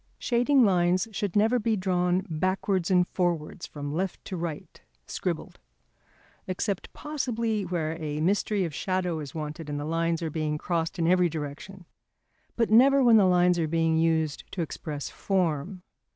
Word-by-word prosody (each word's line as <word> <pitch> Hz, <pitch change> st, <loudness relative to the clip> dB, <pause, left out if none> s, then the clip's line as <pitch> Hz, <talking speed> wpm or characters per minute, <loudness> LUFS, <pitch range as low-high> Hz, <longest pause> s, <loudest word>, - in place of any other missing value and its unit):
Shading 245 Hz, +2 st, +3 dB
lines 180 Hz, 0 st, +2 dB
should 200 Hz, -3 st, -3 dB
never 220 Hz, +4 st, +3 dB
be 225 Hz, 0 st, +1 dB
drawn 180 Hz, -1 st, 0 dB
backwards 185 Hz, +2 st, 0 dB
and 180 Hz, -1 st, +4 dB
forwards 175 Hz, -1 st, -2 dB
from 145 Hz, -1 st, -6 dB
left 185 Hz, +3 st, -3 dB
to 190 Hz, -, -5 dB
right 165 Hz, -3 st, -6 dB, 0.2 s
(scribbled), -, -, -4 dB, 0.9 s
except 190 Hz, +1 st, -3 dB
possibly 235 Hz, -8 st, -2 dB
where 165 Hz, -3 st, -2 dB
a 150 Hz, -1 st, -3 dB
mystery 195 Hz, +3 st, +1 dB
of 165 Hz, -, -5 dB
shadow 180 Hz, -1 st, -1 dB
is 145 Hz, -2 st, -8 dB
wanted 155 Hz, 0 st, -5 dB
and 145 Hz, 0 st, -3 dB
the 145 Hz, -, -4 dB
lines 165 Hz, +1 st, 0 dB
are 160 Hz, -, -2 dB
being 155 Hz, -1 st, -1 dB
crossed 165 Hz, +2 st, -2 dB
in 165 Hz, -, 0 dB
every 180 Hz, 0 st, +4 dB
direction; 160 Hz, +5 st, -7 dB, 0.7 s
but 230 Hz, -2 st, +1 dB
never 270 Hz, +4 st, +6 dB
when 235 Hz, -2 st, +7 dB
lines 180 Hz, -3 st, +4 dB
are 160 Hz, -, +1 dB
being 165 Hz, 0 st, +1 dB
used 160 Hz, -2 st, +1 dB
to 175 Hz, -, -1 dB
express 150 Hz, -2 st, -5 dB
form. 180 Hz, -1 st, -1 dB
180 Hz, 155 wpm, -27 LUFS, 160-195 Hz, 0.9 s, when